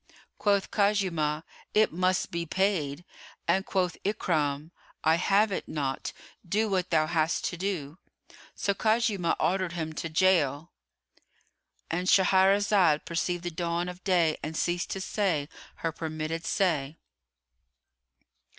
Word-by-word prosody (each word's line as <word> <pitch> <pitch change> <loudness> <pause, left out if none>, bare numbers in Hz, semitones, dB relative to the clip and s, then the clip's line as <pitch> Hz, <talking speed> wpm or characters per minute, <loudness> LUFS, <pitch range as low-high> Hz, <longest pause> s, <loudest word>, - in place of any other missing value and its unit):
Quoth 200 -2 +1
Khuzaymah, 180 -7 +1 0.3
"It 215 -4 +4
must 185 +1 +1
be 170 0 -2
paid;" 175 -4 0 0.4
and 195 +1 +2
quoth 180 -2 0
Ikrimah, 160 -7 -1 0.3
"I 160 - +4
have 200 +4 +3
it - - -3
not; 135 -3 -3 0.3
do 210 +5 0
what 185 -3 0
thou 155 -2 +3
hast 160 0 0
to - - -2
do." 175 -4 -3 0.6
So 200 - 0
Khuzaymah 215 -4 +1
ordered 185 -2 0
him 160 -2 -4
to 165 - -4
gaol.——And 165 +1 -3
Shahrazad 190 -3 +4
perceived 175 +1 -2
the 175 - -3
dawn 170 +1 -2
of 180 +1 -8
day 175 -5 +2
and 155 0 -5
ceased 175 0 -1
to 195 - -3
say 185 -8 0 0.3
her 165 - -2
permitted 160 +1 -4
say. 160 -6 0
175 Hz, 125 wpm, -28 LUFS, 160-195 Hz, 0.6 s, It